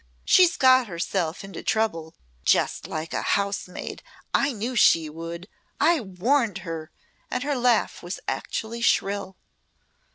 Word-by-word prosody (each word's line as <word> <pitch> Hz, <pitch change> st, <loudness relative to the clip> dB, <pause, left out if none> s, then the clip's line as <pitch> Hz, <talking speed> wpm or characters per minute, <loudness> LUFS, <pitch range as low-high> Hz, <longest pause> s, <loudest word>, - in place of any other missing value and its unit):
She's 355 Hz, -1 st, +5 dB
got 255 Hz, -2 st, +5 dB
herself 170 Hz, -1 st, -2 dB
into 195 Hz, 0 st, -8 dB
trouble 165 Hz, -8 st, -1 dB, 0.3 s
just -, -, +1 dB
like 160 Hz, +1 st, -5 dB
a -, -, -1 dB
housemaid. 200 Hz, -2 st, -2 dB, 0.3 s
I 275 Hz, -, +3 dB
knew 240 Hz, +2 st, -4 dB
she 160 Hz, -8 st, +4 dB
would 165 Hz, +3 st, -7 dB, 0.3 s
I 340 Hz, -1 st, +4 dB
warned 215 Hz, +2 st, 0 dB
her," 165 Hz, -1 st, -5 dB, 0.4 s
and 250 Hz, -, -2 dB
her 290 Hz, 0 st, 0 dB
laugh 245 Hz, -4 st, +1 dB
was 175 Hz, +2 st, -6 dB
actually 230 Hz, +1 st, -3 dB
shrill. 200 Hz, -4 st, 0 dB
200 Hz, 130 wpm, -25 LUFS, 170-245 Hz, 0.4 s, She's